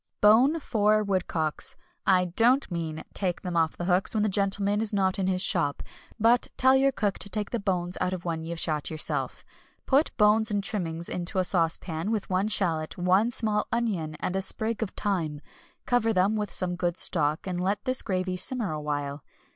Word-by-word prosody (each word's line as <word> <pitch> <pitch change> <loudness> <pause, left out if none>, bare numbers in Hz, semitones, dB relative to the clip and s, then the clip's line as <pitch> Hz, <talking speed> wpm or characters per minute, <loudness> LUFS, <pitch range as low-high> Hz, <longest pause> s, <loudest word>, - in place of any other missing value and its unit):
Bone 245 +10 +5
four 215 -5 +2
woodcocks 180 -6 -1 0.3
I 185 -1 +4
don't 235 +8 +2
mean 160 -2 -4
take 180 -3 -2
them 180 -1 -4
off 160 -1 +1
the 175 - -4
hooks 185 +4 +1
when 210 - +2
the 215 - +1
gentleman 200 +1 +1
is 220 - -1
not 190 -2 0
in 190 - 0
his 185 0 +2
shop, 165 -9 +1 0.4
but 235 +3 +4
tell 260 +1 +5
your 270 +1 +3
cook 205 -6 -2
to 200 - 0
take 210 0 -3
the 235 - -1
bones 180 -3 -2
out 180 0 0
of 180 -2 -5
one 165 -2 -2
you've 165 0 -5
shot 155 -3 0
yourself 155 -1 -3 0.4
put 285 +4 +3
bones 215 +1 +4
and 205 -1 -1
trimmings 170 -5 -3
into 180 +1 -4
a 185 - +3
saucepan 165 0 0
with 215 -4 -2
one 185 +3 +1
shallot, 165 -7 0
one 185 +5 +3
small 215 -3 0
onion, 190 -10 -1
and 185 - -2
a 190 - 0
sprig 220 +3 -2
of 220 - -1
thyme, 170 -9 -2 0.5
cover 245 -2 +2
them 195 +1 +2
with 210 -1 -3
some 180 -1 +1
good 175 0 -2
stock, 155 -3 +1
and 180 -2 -3
let 200 +2 -1
this 255 0 +2
gravy 185 -1 -2
simmer 215 +2 -1
awhile. 145 -2 -4
190 Hz, 195 wpm, -27 LUFS, 170-215 Hz, 0.5 s, Bone